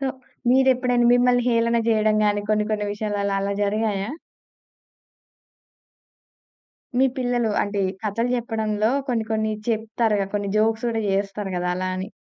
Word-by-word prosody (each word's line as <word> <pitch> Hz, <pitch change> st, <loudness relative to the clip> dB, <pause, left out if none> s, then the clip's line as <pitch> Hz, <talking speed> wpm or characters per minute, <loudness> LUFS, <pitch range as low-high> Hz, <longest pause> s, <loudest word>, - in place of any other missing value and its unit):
So 275 Hz, -, -1 dB, 0.4 s
మీరేప్పుడైనా 255 Hz, -2 st, +3 dB
మిమ్మల్ని 245 Hz, 0 st, +3 dB
హేళన 230 Hz, 0 st, +2 dB
జేయడం 215 Hz, -1 st, +3 dB
గాని, 205 Hz, 0 st, +1 dB
కొన్ని 210 Hz, 0 st, +2 dB
కొన్ని 210 Hz, -1 st, -1 dB
విషయాలలో 205 Hz, -1 st, -2 dB
అలా 200 Hz, +1 st, -1 dB
జరిగాయా? 205 Hz, 0 st, -1 dB, 2.9 s
మీ 265 Hz, -, +5 dB
పిల్లలు 245 Hz, -3 st, 0 dB
అంటే 205 Hz, 0 st, -2 dB, 0.2 s
కథలు 230 Hz, +3 st, -1 dB
జెప్పడంలో 220 Hz, -2 st, -1 dB, 0.2 s
కొన్ని 230 Hz, -3 st, 0 dB
కొన్ని 220 Hz, 0 st, 0 dB, 0.2 s
చెప్తారు 220 Hz, -1 st, 0 dB
గదా! 195 Hz, -, -1 dB
కొన్ని 205 Hz, -1 st, -1 dB
జోక్స్ 220 Hz, +2 st, +1 dB
గూడా 225 Hz, -1 st, -1 dB
జేస్తారు 195 Hz, 0 st, -2 dB
కదా! 180 Hz, 0 st, -1 dB
అలా 185 Hz, 0 st, -2 dB
అని. 190 Hz, +2 st, -4 dB
220 Hz, 135 wpm, -23 LUFS, 205-235 Hz, 2.9 s, మీ